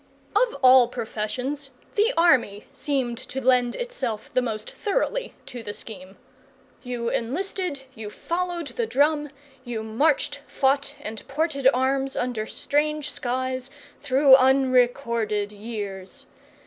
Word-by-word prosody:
Of 470 +3 +3
all 255 -1 +8
professions, 250 +6 -4 0.2
the 430 +3 +3
army 255 -11 +3
seemed 255 -5 -1
to 260 +1 -5
lend 250 -2 +3
itself 485 - -4
the 255 - +3
most 220 -3 -4
thoroughly - - -1
to 245 -2 -7
the 205 -2 -6
scheme. 190 -4 -10 0.6
You 240 -2 -3
enlisted, 310 +3 -2
you 220 -3 -7
followed 345 +3 -3
the 235 -2 -2
drum, 295 +5 +2 0.3
you 235 -3 -4
marched, 285 +6 +1
fought, 280 +1 +1
and 220 -3 -6
ported 280 -2 0
arms, 270 +1 0
under 240 -3 -2
strange 300 0 -1
skies, 255 +1 -2 0.3
through 275 -1 +5
unrecorded 245 -5 +2
years. 205 -3 -6
260 Hz, 120 wpm, -25 LUFS, 230-290 Hz, 0.6 s, all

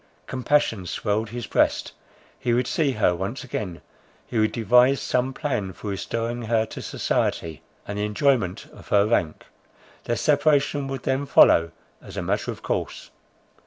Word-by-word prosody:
Compassion 125 -7 0
swelled 105 +4 -1
his 120 +1 -5
breast; - - +1 0.5
he 120 -3 +1
would 125 +1 +1
see 140 0 0
her 105 -5 +2
once 95 +11 -4
again; 105 -8 -5 0.4
he 115 - -2
would 110 0 +2
devise 125 +4 +4
some 125 +1 0
plan 125 -10 -3
for 105 - -6
restoring 115 +4 -3
her 110 -1 +1
to - - -8
society, 80 -2 -2 0.3
and 105 0 -4
the - - 0
enjoyment 105 -3 +1
of - - -14
her 100 0 +4
rank; 90 -8 0 0.6
their 120 - 0
separation 145 0 +2
would 135 -2 -5
then 135 +2 -1
follow, 85 -10 +6 0.3
as - - -11
a - - -2
matter - - -1
of - - -6
course. - - -3
115 Hz, 160 wpm, -24 LUFS, 105-135 Hz, 0.6 s, follow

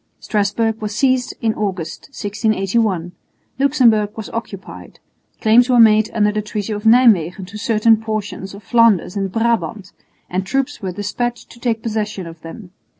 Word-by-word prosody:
Strasburg 215 +2 -1
was 210 -1 -4
seized 255 -1 +1
in 225 -2 +1
August, 185 -7 -4
1681; 205 -5 -1 0.5
Luxemburg 245 -7 +3
was 220 - -7
occupied; 205 -4 -8 0.4
claims 235 +3 +5
were 245 -1 +4
made 215 -1 +5
under 210 -1 +3
the 210 0 -2
treaty 210 0 -4
of 210 +1 -6
Nijmwegen 205 -7 +4
to 200 +3 -10
certain 225 +1 +3
portions 215 -3 -5
of 205 - -13
Flanders 220 -4 +3
and 195 -2 -2
Brabant, 220 -4 -1 0.4
and 185 +1 -2
troops 270 +8 -2
were 190 -2 -3
despatched 220 +5 -4
to 235 - -15
take 230 -2 -2
possession 210 -4 -3
of 165 -1 -11
them. 175 +3 -10
215 Hz, 150 wpm, -18 LUFS, 195-230 Hz, 0.5 s, claims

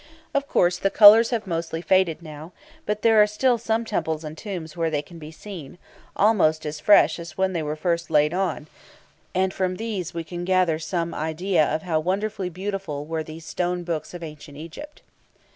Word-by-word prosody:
Of 280 0 0
course, 175 -6 +2
the 195 - +1
colours 215 +3 +8
have 230 -3 -2
mostly 165 -2 -3
faded 175 -1 +1
now; 155 +2 -10 0.3
but 210 0 -2
there 225 -2 +6
are 210 - +5
still 240 +3 +1
some 225 +1 -1
temples 160 -7 -2
and 155 0 -7
tombs 175 -4 -7
where 165 -1 0
they 150 -2 -1
can 170 +2 -13
be 155 -1 -9
seen, 165 -2 -10 0.4
almost 175 -8 +3
as 150 0 -4
fresh 160 -2 +5
as 165 -2 -9
when 190 0 +1
they 170 - -1
were 150 0 -3
first 170 +1 -1
laid 150 +2 +3
on, 180 -5 -1 0.7
and 190 +1 +1
from 185 -1 -1
these 205 -4 -4
we 170 -1 -4
can 175 +2 -6
gather 180 -3 +2
some 170 0 -3
idea 160 +2 0
of 155 +2 -2
how 160 -3 0
wonderfully 190 +3 -2
beautiful 185 -5 -5
were 160 +1 -3
these 155 +1 -9
stone 180 +1 -2
books 165 -1 -4
of 175 - -7
ancient 150 -2 -10
Egypt. 230 - -10
175 Hz, 195 wpm, -24 LUFS, 160-195 Hz, 0.7 s, colours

